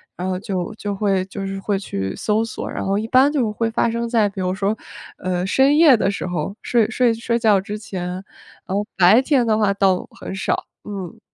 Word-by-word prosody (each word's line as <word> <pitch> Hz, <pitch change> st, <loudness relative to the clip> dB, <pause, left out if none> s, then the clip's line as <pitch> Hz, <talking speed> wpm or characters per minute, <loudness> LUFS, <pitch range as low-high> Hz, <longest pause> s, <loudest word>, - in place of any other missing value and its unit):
然 180 Hz, +1 st, -4 dB
后 185 Hz, -1 st, -2 dB
就 190 Hz, -2 st, -3 dB
就 205 Hz, -2 st, -4 dB
会 195 Hz, -2 st, +1 dB
就 195 Hz, 0 st, -6 dB
是 195 Hz, 0 st, -4 dB
会 200 Hz, 0 st, -1 dB
去 95 Hz, -, -4 dB
搜 215 Hz, +1 st, 0 dB
索， 225 Hz, -, -5 dB
然 -, -, -4 dB
后 195 Hz, +1 st, 0 dB
一 215 Hz, +2 st, -2 dB
般 260 Hz, +4 st, +5 dB
就 250 Hz, -8 st, 0 dB
会 225 Hz, +1 st, -1 dB
发 230 Hz, +1 st, +1 dB
生 235 Hz, 0 st, -2 dB
在 225 Hz, -3 st, +3 dB
比 195 Hz, -1 st, -6 dB
如 185 Hz, 0 st, -1 dB
说， 200 Hz, +2 st, 0 dB, 0.4 s
呃， 180 Hz, 0 st, -2 dB
深 270 Hz, +8 st, +3 dB
夜 310 Hz, -6 st, +7 dB
的 200 Hz, -, +1 dB
时 200 Hz, -, -3 dB
候， 175 Hz, +1 st, -3 dB
睡 230 Hz, -3 st, +2 dB
睡 240 Hz, 0 st, +2 dB
睡 235 Hz, +1 st, -1 dB
觉 215 Hz, -4 st, +3 dB
之 205 Hz, +2 st, -5 dB
前， 195 Hz, -5 st, -5 dB
然 185 Hz, +1 st, -9 dB
后 205 Hz, -, 0 dB
白 190 Hz, +6 st, +6 dB
天 265 Hz, -3 st, +2 dB
的 220 Hz, -, +2 dB
话 210 Hz, -2 st, +3 dB
倒 195 Hz, -2 st, +1 dB
很 190 Hz, -, -6 dB
少， 190 Hz, -, -1 dB, 0.2 s
嗯。 195 Hz, -5 st, -7 dB
205 Hz, 240 characters per minute, -21 LUFS, 190-230 Hz, 0.4 s, 夜